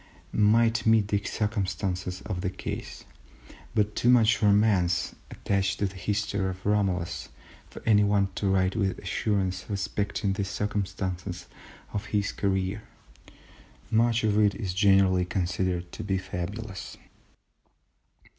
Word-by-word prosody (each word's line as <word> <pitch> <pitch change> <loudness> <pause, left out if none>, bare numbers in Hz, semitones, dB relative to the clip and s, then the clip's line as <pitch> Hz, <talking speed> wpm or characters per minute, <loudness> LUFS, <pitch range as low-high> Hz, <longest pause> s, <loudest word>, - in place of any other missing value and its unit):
C., - - -4
might 115 +2 +4
meet 110 -2 +4
the 100 -1 0
circumstances 95 -4 -2
of 95 -4 -4
the 95 - -1
case, 95 - -6 0.7
but 105 0 +1
too 120 - +2
much 120 -1 +5
romance 100 -4 +3 0.2
attaches 95 -4 -1
to 100 - -1
the 95 0 -4
history 100 0 -1
of 95 0 -8
Romulus 95 -5 0 0.4
for - - -11
anyone 105 -2 +4
to 100 +1 -1
write 95 0 +2
with 100 -4 0
assurance 95 -3 -1
respecting 100 0 -1
the 100 0 -2
circumstances 95 -3 -3 0.5
of 105 +1 -3
his 105 -2 0
career. 95 +1 -1 1.1
Much 115 +1 +3
of 105 -1 +2
it 105 -2 +3
is 95 -3 -3
generally 95 -2 +4
considered 90 -1 -2
to - - -6
be 95 -1 0
fabulous. 95 +3 -6
100 Hz, 125 wpm, -27 LUFS, 95-105 Hz, 1.1 s, much